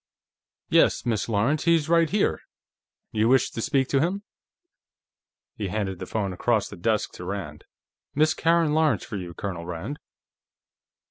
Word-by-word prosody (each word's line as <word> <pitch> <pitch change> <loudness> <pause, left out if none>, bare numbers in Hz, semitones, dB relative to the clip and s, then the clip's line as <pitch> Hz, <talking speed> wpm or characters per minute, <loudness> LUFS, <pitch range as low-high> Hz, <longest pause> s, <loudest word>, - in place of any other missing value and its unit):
"Yes, - - +3
Miss 115 -1 -1
Lawrence; 120 +10 +1
he's 165 -3 +3
right 165 -1 +3
here. 205 +1 +1 0.7
You 110 +1 +2
wish 130 -1 +3
to 115 - -4
speak 135 +2 +1
to 135 - +2
him?" 185 +7 -1 1.3
He 105 - -3
handed 95 -2 -3
the - - -6
phone 100 -4 -2
across 110 +3 +1
the - - -9
desk 105 +4 0
to - - -10
Rand. 90 -5 -6 0.5
"Miss 155 +2 +3
Karen 165 -2 +2
Lawrence, 155 -1 +2
for 105 - -5
you, 90 -3 -7
Colonel 90 -4 -5
Rand." 90 - -5
115 Hz, 150 wpm, -25 LUFS, 100-155 Hz, 1.3 s, Yes